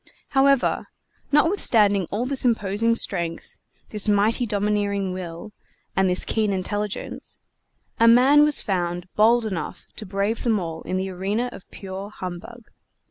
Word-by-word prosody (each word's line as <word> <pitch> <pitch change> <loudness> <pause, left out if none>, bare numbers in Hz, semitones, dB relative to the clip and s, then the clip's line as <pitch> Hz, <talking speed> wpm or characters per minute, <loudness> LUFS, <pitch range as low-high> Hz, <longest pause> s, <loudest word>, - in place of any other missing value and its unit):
However, 275 -1 +2 0.4
notwithstanding 225 - +3
all 220 +5 -2
this 270 0 0
imposing 230 -1 +1
strength, 170 -7 -3 0.3
this 210 0 -2
mighty 215 +4 +2
domineering 205 -2 -1
will, 180 +2 -7 0.4
and 190 -1 +2
this 180 - +1
keen 215 -2 0
intelligence, 205 +2 -4 0.6
a 230 - +5
man 260 +5 +6
was 300 -1 +3
found 175 -2 -2
bold 230 +2 +4
enough 190 -6 -5
to 215 - -6
brave 200 +4 -1
them 225 -4 +1
all 165 -2 -5
in 185 - -3
the 190 0 -3
arena 200 +7 -2
of 190 - -13
pure 195 +1 -8
humbug. 190 +5 -9
205 Hz, 135 wpm, -23 LUFS, 190-230 Hz, 0.6 s, man